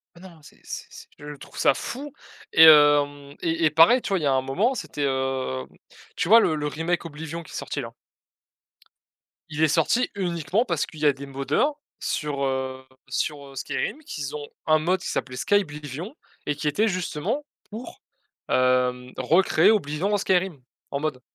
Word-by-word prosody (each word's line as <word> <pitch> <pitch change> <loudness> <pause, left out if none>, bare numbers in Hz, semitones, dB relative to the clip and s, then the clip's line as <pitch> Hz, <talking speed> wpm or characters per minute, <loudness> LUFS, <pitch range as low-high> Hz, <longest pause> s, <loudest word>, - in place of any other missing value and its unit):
Bah 170 - -15
non, 180 -4 -13
c'est - - -17
c'est - - -7
c'est - - -12
je 150 0 -8
trouve 140 - -14
ça - - +4
fou 280 - -6 0.4
et 160 - +8
hem 145 -2 +6
et 165 0 0
et - - +5
pareil, 165 - +6
tu - - -5
vois, 195 -2 +1
il - - -5
y - - +1
a 140 - +3
un 130 - +2
moment 180 - 0
c'était, 150 - -5
hem, 130 - -1 0.5
tu - - -1
vois 225 +5 +8
le 160 -8 +2
le 150 -1 -2
remake 165 +4 -2
Oblivion 160 +1 -7
qui - - -15
est - - -9
sorti 145 - -4
là? 115 -2 -8 1.6
Il 155 0 -1
est - - +6
sorti 165 +11 +2
uniquement 180 - 0
parce 170 - -1
qu'il 155 - -13
y 150 - 0
a 145 - +5
des 140 +1 -9
moddeur 140 - 0 0.2
sur, 145 -2 -2
heu 130 -1 -2 0.2
sur, 145 -2 -3
heu, 135 - -14
Skyrim 135 - -3
qu'ils 145 - -5
ont 145 -1 -5 0.2
un 155 0 +5
mod 180 +4 +1
qui - - -7
s'appelait 130 -1 -3
Skyblivion 155 - -2 0.3
et 150 - -1
qui 150 +1 -4
était 205 +10 +2
justement 185 - -2 0.2
pour, 220 +4 -9 0.5
hem, 125 0 +2
recréer 160 +6 +4
Oblivion 190 -1 0
en - - +4
Skyrim 185 -6 0 0.3
en 140 - -2
mod. 145 -4 -3
150 Hz, 190 wpm, -24 LUFS, 140-180 Hz, 1.6 s, et